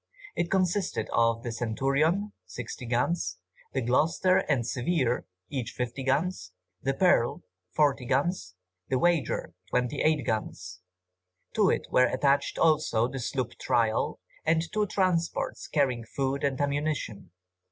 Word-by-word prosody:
It 175 Hz, -, 0 dB
consisted 190 Hz, 0 st, 0 dB
of 115 Hz, 0 st, +2 dB
the 120 Hz, -, -3 dB
Centurion, 140 Hz, -, 0 dB
60 120 Hz, +5 st, -7 dB
guns, 120 Hz, -, 0 dB, 0.4 s
the 135 Hz, -, 0 dB
Gloucester 165 Hz, +9 st, +3 dB
and 130 Hz, -6 st, +2 dB
Severe, 125 Hz, 0 st, 0 dB, 0.2 s
each 125 Hz, -4 st, -3 dB
50 125 Hz, +2 st, -3 dB
guns, 135 Hz, -, 0 dB, 0.3 s
the 135 Hz, +1 st, 0 dB
Pearl, 175 Hz, -10 st, +3 dB, 0.3 s
40 140 Hz, -4 st, +2 dB
guns, 135 Hz, -, 0 dB, 0.3 s
the 130 Hz, -, +2 dB
Wager, 155 Hz, -, +1 dB, 0.2 s
28 130 Hz, +4 st, +1 dB
guns. 95 Hz, -5 st, -3 dB, 0.7 s
To -, -, +4 dB
it -, -, 0 dB
were 125 Hz, 0 st, +5 dB
attached 140 Hz, +3 st, +1 dB
also 155 Hz, -8 st, +3 dB
the 135 Hz, +1 st, -5 dB
sloop 125 Hz, 0 st, -2 dB
Trial, 115 Hz, -2 st, +1 dB, 0.2 s
and 160 Hz, 0 st, +2 dB
two 210 Hz, -1 st, +1 dB
transports 180 Hz, -4 st, 0 dB
carrying 130 Hz, -6 st, +1 dB
food 135 Hz, +4 st, -2 dB
and 140 Hz, -2 st, 0 dB
ammunition. 145 Hz, -6 st, -2 dB
135 Hz, 125 wpm, -28 LUFS, 120-160 Hz, 0.7 s, were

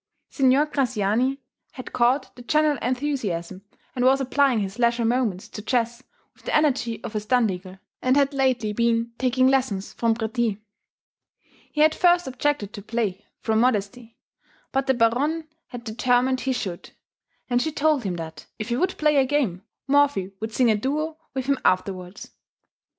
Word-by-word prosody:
Signor 270 Hz, +1 st, +4 dB
Graziani 255 Hz, -1 st, 0 dB, 0.3 s
had 255 Hz, -, -9 dB
caught 245 Hz, +4 st, +1 dB
the 245 Hz, -, -11 dB
general 300 Hz, +2 st, +2 dB
enthusiasm, 230 Hz, -9 st, -2 dB, 0.3 s
and 245 Hz, -, 0 dB
was 265 Hz, +2 st, +5 dB
applying 270 Hz, -2 st, +2 dB
his 200 Hz, +2 st, -4 dB
leisure 235 Hz, -1 st, +2 dB
moments 225 Hz, -6 st, 0 dB
to 210 Hz, -, -7 dB
chess 235 Hz, +1 st, -1 dB, 0.3 s
with -, -, -25 dB
the -, -, -1 dB
energy 270 Hz, -6 st, +1 dB
of -, -, -6 dB
a -, -, +1 dB
Standigl, 205 Hz, -5 st, -1 dB, 0.2 s
and 255 Hz, +2 st, +3 dB
had 280 Hz, 0 st, +3 dB
lately 255 Hz, -6 st, +1 dB
been 235 Hz, +1 st, +1 dB
taking 255 Hz, 0 st, +3 dB
lessons 255 Hz, -8 st, 0 dB
from 230 Hz, -1 st, +1 dB
Préti. 225 Hz, -2 st, -1 dB, 1.1 s
He 300 Hz, -, +3 dB
at 310 Hz, 0 st, +5 dB
first 350 Hz, -1 st, +3 dB
objected 255 Hz, -5 st, -1 dB
to 205 Hz, -, -7 dB
play, 210 Hz, -3 st, -3 dB
from 220 Hz, -1 st, +1 dB
modesty, 230 Hz, 0 st, -1 dB, 0.5 s
but 270 Hz, 0 st, 0 dB
the 265 Hz, -, +3 dB
Baronne 280 Hz, +8 st, +1 dB, 0.2 s
had 245 Hz, -2 st, -8 dB
determined 245 Hz, +3 st, +1 dB
he 265 Hz, -, -1 dB
should, 190 Hz, -8 st, -5 dB, 0.6 s
and 245 Hz, -1 st, +1 dB
she 315 Hz, -, -1 dB
told 300 Hz, -2 st, +1 dB
him 190 Hz, -3 st, -2 dB
that, 160 Hz, -2 st, -8 dB
if 215 Hz, +2 st, -5 dB
he 240 Hz, -, 0 dB
would 370 Hz, +5 st, 0 dB
play 300 Hz, -1 st, +3 dB
a 270 Hz, -, +5 dB
game, 255 Hz, -11 st, 0 dB, 0.3 s
Morphy 280 Hz, -9 st, +2 dB
would 220 Hz, +1 st, -4 dB
sing 240 Hz, 0 st, +3 dB
a -, -, +3 dB
duo 305 Hz, +8 st, -2 dB, 0.2 s
with 260 Hz, -1 st, -2 dB
him 275 Hz, -1 st, +1 dB
afterwards. 185 Hz, 0 st, -1 dB
245 Hz, 165 wpm, -24 LUFS, 215-270 Hz, 1.1 s, was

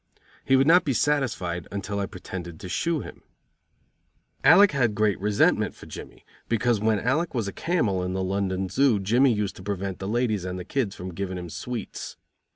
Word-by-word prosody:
He 135 Hz, -, +3 dB
would 135 Hz, +1 st, +4 dB
not 170 Hz, +4 st, +6 dB
be 140 Hz, -, 0 dB
satisfied 110 Hz, -, 0 dB
until 100 Hz, 0 st, -3 dB
I 100 Hz, -, -1 dB
pretended 90 Hz, -2 st, -8 dB
to -, -, -7 dB
shoe 165 Hz, -, 0 dB
him. -, -, -10 dB, 1.2 s
Alec 185 Hz, +8 st, +7 dB
had 120 Hz, -7 st, +1 dB
great 105 Hz, -2 st, +1 dB
resentment 105 Hz, +1 st, +2 dB
for -, -, -13 dB
Jimmy -, -, -10 dB, 0.2 s
because 115 Hz, 0 st, +2 dB
when 110 Hz, 0 st, +2 dB
Alec 145 Hz, +8 st, 0 dB
was 115 Hz, -4 st, -1 dB
a 100 Hz, -, -5 dB
camel 120 Hz, -, 0 dB
in 90 Hz, 0 st, -2 dB
the 95 Hz, 0 st, -1 dB
London 95 Hz, 0 st, -1 dB
Zoo 120 Hz, +2 st, +3 dB
Jimmy 120 Hz, +7 st, +3 dB
used 105 Hz, -3 st, -1 dB
to -, -, -10 dB
prevent 100 Hz, -1 st, -3 dB
the 95 Hz, -, -4 dB
ladies 110 Hz, -3 st, 0 dB
and 90 Hz, 0 st, -4 dB
the 90 Hz, -, -6 dB
kids 115 Hz, -6 st, -1 dB
from 90 Hz, 0 st, -7 dB
giving 95 Hz, +1 st, -4 dB
him 90 Hz, -2 st, -7 dB
sweets. 120 Hz, -5 st, -6 dB
105 Hz, 190 wpm, -25 LUFS, 95-125 Hz, 1.2 s, Alec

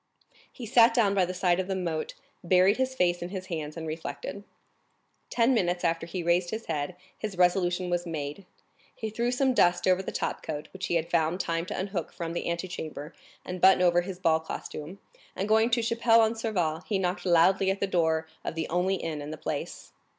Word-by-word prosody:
He 245 Hz, -, -8 dB
sat 230 Hz, 0 st, +5 dB
down 210 Hz, -5 st, +3 dB
by 190 Hz, -2 st, +3 dB
the 180 Hz, -, -4 dB
side 180 Hz, -1 st, +2 dB
of 185 Hz, -, -2 dB
the 190 Hz, -, -1 dB
moat, 170 Hz, -4 st, -3 dB, 0.3 s
buried 185 Hz, +3 st, +4 dB
his 260 Hz, 0 st, -1 dB
face 175 Hz, -5 st, +1 dB
in 175 Hz, -, -4 dB
his 185 Hz, -1 st, -5 dB
hands 155 Hz, -1 st, -5 dB
and 165 Hz, -, -5 dB
reflected. 160 Hz, +5 st, -6 dB, 0.9 s
Ten 240 Hz, +2 st, +3 dB
minutes 175 Hz, -6 st, 0 dB
after 165 Hz, -1 st, 0 dB
he 175 Hz, 0 st, -4 dB
raised 175 Hz, +1 st, +2 dB
his 220 Hz, +3 st, -5 dB
head; 150 Hz, +4 st, -3 dB, 0.2 s
his 210 Hz, -4 st, -6 dB
resolution 180 Hz, 0 st, +2 dB
was 175 Hz, 0 st, -1 dB
made. 155 Hz, +3 st, -5 dB, 0.5 s
He 220 Hz, -1 st, -5 dB
threw 235 Hz, +3 st, 0 dB
some 260 Hz, +1 st, +2 dB
dust 175 Hz, -5 st, +3 dB
over 185 Hz, 0 st, +4 dB
the -, -, -5 dB
topcoat, 150 Hz, -1 st, -4 dB
which 190 Hz, -1 st, -4 dB
he -, -, 0 dB
had 165 Hz, +1 st, -1 dB
found 170 Hz, +1 st, +1 dB
time 165 Hz, -1 st, -1 dB
to -, -, -4 dB
unhook 190 Hz, -3 st, -3 dB
from 170 Hz, -1 st, -5 dB
the 170 Hz, -, -2 dB
antechamber 170 Hz, -4 st, -5 dB, 0.3 s
and 180 Hz, -1 st, -6 dB
button 190 Hz, -1 st, +6 dB
over 175 Hz, 0 st, +4 dB
his 180 Hz, 0 st, -6 dB
ball 165 Hz, -3 st, +2 dB
costume, 160 Hz, +2 st, -7 dB, 0.4 s
and 195 Hz, -, -2 dB
going 220 Hz, +2 st, +4 dB
to 235 Hz, 0 st, +1 dB
Chapelle 230 Hz, 0 st, +4 dB
en 220 Hz, +1 st, +2 dB
Serval 185 Hz, -9 st, -1 dB
he 205 Hz, -, +1 dB
knocked 185 Hz, 0 st, -1 dB
loudly 185 Hz, +2 st, +4 dB
at 195 Hz, +1 st, 0 dB
the -, -, +1 dB
door 160 Hz, -4 st, +1 dB, 0.2 s
of -, -, -4 dB
the 165 Hz, -1 st, -2 dB
only 180 Hz, +3 st, +1 dB
inn 160 Hz, -5 st, -4 dB
in 145 Hz, -, -6 dB
the 155 Hz, -, -6 dB
place. -, -, -5 dB
180 Hz, 210 wpm, -28 LUFS, 165-200 Hz, 0.9 s, button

